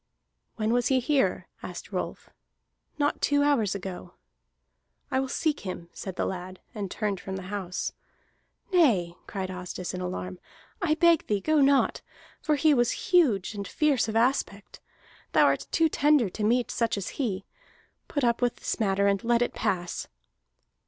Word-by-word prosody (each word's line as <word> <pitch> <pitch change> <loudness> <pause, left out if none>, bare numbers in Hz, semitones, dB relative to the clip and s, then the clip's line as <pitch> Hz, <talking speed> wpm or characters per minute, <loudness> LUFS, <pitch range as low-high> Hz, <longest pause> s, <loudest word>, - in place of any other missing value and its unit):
"When 220 +1 0
was 245 0 +2
he 265 -1 +3
here?" 270 +1 +1
asked - - -8
Rolf. - - -4 0.7
"Not 290 -1 0
two 285 0 +3
hours 230 -9 +2
ago." 185 - -7 1.0
"I 260 - +2
will 265 - -1
seek 300 +2 0
him," 175 -3 -6
said 190 -2 -6
the - - -1
lad, 185 0 -5
and 205 -4 -4
turned 205 0 -2
from 190 +1 -6
the 190 - -5
house. 185 -3 -3 0.8
"Nay," 215 - +4
cried 190 -2 -4
Asdis 180 0 -5
in 185 - -4
alarm, 180 0 -4 0.4
"I 320 -4 +2
beg 335 -1 +4
thee, 205 -1 +1
go 310 +8 +2
not! 275 0 +3 0.4
For 305 - +2
he 300 +1 +4
was 240 +6 0
huge 235 - +4
and 200 -2 -5
fierce 290 -3 +2
of 220 - -3
aspect. 225 -4 0 0.5
Thou - - +6
art - - +1
too 330 -1 +3
tender 290 -7 +3
to 215 - -4
meet 240 +3 +2
such 230 -2 0
as 195 - -3
he. 195 -6 -2 0.6
Put 285 - -2
up 235 0 +2
with 245 -1 +1
this - - -3
matter 200 -2 +2
and 200 +2 +2
let 235 +1 +3
it - - -3
pass." 185 -5 -2
225 Hz, 165 wpm, -27 LUFS, 190-280 Hz, 1.0 s, Thou